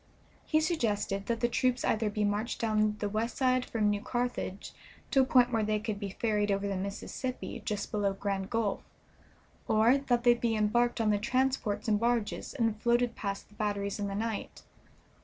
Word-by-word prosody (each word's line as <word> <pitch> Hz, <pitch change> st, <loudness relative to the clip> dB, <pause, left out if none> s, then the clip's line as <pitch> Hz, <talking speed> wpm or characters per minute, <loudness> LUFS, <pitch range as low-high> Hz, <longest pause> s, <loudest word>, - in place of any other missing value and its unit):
He 310 Hz, -, +3 dB
suggested 210 Hz, -, -1 dB
that 230 Hz, -1 st, -1 dB
the 240 Hz, -, +3 dB
troops 250 Hz, +1 st, +1 dB
either 220 Hz, -1 st, +1 dB
be 210 Hz, 0 st, -1 dB
marched 210 Hz, +3 st, -1 dB
down 215 Hz, -2 st, +1 dB
the 210 Hz, -, -2 dB
west 220 Hz, +3 st, -2 dB
side 255 Hz, -1 st, +2 dB
from 215 Hz, -4 st, +1 dB
New 205 Hz, 0 st, -1 dB
Carthage 240 Hz, -6 st, -3 dB, 0.4 s
to 270 Hz, -, +5 dB
a -, -, +3 dB
point 250 Hz, -1 st, +4 dB
where 225 Hz, -, +2 dB
they 215 Hz, 0 st, +1 dB
could 210 Hz, -1 st, -4 dB
be 200 Hz, -1 st, -4 dB
ferried 210 Hz, -2 st, +1 dB
over 200 Hz, 0 st, 0 dB
the 200 Hz, -, -2 dB
Mississippi 200 Hz, +6 st, -4 dB
just 210 Hz, -3 st, -3 dB
below 205 Hz, -2 st, +1 dB
Grand 195 Hz, -1 st, -3 dB
Gulf, 225 Hz, -4 st, 0 dB, 0.9 s
or 225 Hz, +5 st, +4 dB
that 245 Hz, -3 st, 0 dB
they 240 Hz, -1 st, +7 dB
be 235 Hz, -1 st, 0 dB
embarked 235 Hz, +3 st, +2 dB
on 220 Hz, -2 st, +3 dB
the 205 Hz, -, +2 dB
transports 255 Hz, -2 st, 0 dB
and 210 Hz, -1 st, +3 dB
barges 235 Hz, +1 st, -1 dB
and 225 Hz, -4 st, 0 dB
floated 240 Hz, 0 st, +2 dB
past 200 Hz, -1 st, -4 dB
the -, -, -20 dB
batteries 205 Hz, -1 st, -2 dB
in 205 Hz, -, -1 dB
the 195 Hz, -, -4 dB
night. 220 Hz, 0 st, -4 dB
215 Hz, 190 wpm, -30 LUFS, 205-240 Hz, 0.9 s, they